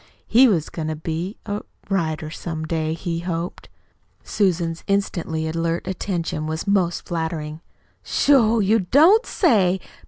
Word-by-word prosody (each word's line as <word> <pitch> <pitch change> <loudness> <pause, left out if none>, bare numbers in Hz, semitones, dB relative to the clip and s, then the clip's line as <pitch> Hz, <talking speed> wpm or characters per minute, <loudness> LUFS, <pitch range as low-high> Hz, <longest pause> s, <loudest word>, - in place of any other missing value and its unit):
He 255 +3 +6
was 170 -9 +1
goin' 160 -2 -4
to 155 - -2
be 165 +6 -4
a 205 +1 -3 0.3
writer 160 -5 -1
some 160 -1 -5
day, 160 -1 -1
he 165 0 -3
hoped." 170 0 -4 0.5
Susan's 170 -4 0
instantly 170 -5 -1
alert 165 +1 -1
attention 175 -4 -3
was 160 0 -3
most 190 -4 +1
flattering. 160 -2 -3 0.4
"Sho! 235 -6 +3
You 215 +2 +3
don't 315 - +5
say! 195 - +3
170 Hz, 130 wpm, -22 LUFS, 160-200 Hz, 0.5 s, He